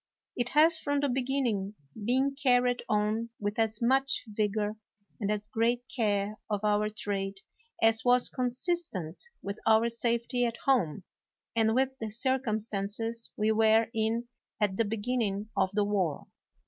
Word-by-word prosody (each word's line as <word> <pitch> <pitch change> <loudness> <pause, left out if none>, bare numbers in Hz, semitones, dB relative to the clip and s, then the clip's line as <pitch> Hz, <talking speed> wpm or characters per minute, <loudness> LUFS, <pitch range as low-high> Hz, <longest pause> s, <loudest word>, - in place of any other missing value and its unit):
It 245 -1 -1
has 320 +1 +6
from 285 -2 0
the 285 - +1
begin 265 +2 0
ning 205 -4 -1 0.3
been 265 +4 +2
carried 250 -3 +2
on 215 +2 +1
with 205 +1 -2
as 225 +1 0
much 270 +3 +2
vigor 210 0 -1 0.4
and 205 -2 -1
as 210 0 -2
great 230 +3 +1
care 210 -3 0
of 210 -1 -1
our 210 0 +2
trade 195 -2 -3 0.4
as 225 0 +4
was 245 0 +4
consistent 250 - -2 0.2
with 200 +1 -5
our 220 +1 +5
safety 235 +1 0
at 235 -1 -1
home 195 - +2 0.5
and 225 0 +3
with 265 +1 +1
the 220 - -3
circumstances 225 -2 -2
we 215 +1 +2
were 220 +1 +4
in 225 +1 0 0.3
at 205 -3 +1
the 230 - +1
beginning 215 -1 -2
of 190 -1 +2
the 210 - +3
war. 190 -7 -1
225 Hz, 150 wpm, -29 LUFS, 210-245 Hz, 0.5 s, has